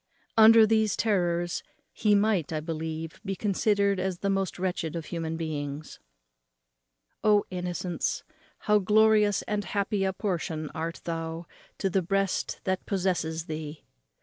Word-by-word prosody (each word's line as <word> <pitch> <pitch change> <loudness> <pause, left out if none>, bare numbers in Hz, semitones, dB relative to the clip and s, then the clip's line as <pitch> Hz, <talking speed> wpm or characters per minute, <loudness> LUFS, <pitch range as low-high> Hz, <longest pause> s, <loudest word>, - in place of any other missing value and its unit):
Under 225 0 +8
these 220 -1 +2
terrors 175 -5 0 0.3
he 210 -2 +3
might, 200 -7 +2
I 155 - -1
believe, 160 0 -5
be 195 -1 -3
considered 200 -1 +1
as 185 -1 -1
the 200 +2 -1
most 195 -1 -1
wretched 180 -3 -2
of 165 -2 -4
human 165 -1 -4
beings. 150 -2 -5 1.2
O 210 -1 +4
innocence, 180 -1 -2 0.4
how 210 0 +3
glorious 210 0 +4
and 210 -1 -2
happy 200 0 -1
a 190 - +1
portion 170 -6 -3
art 165 +1 -4
thou 165 0 -4 0.3
to 195 - 0
the 190 0 +1
breast 195 +2 -1
that 185 -1 -2
possesses 175 -4 -1
thee! 155 -1 -6
185 Hz, 135 wpm, -28 LUFS, 165-205 Hz, 1.2 s, Under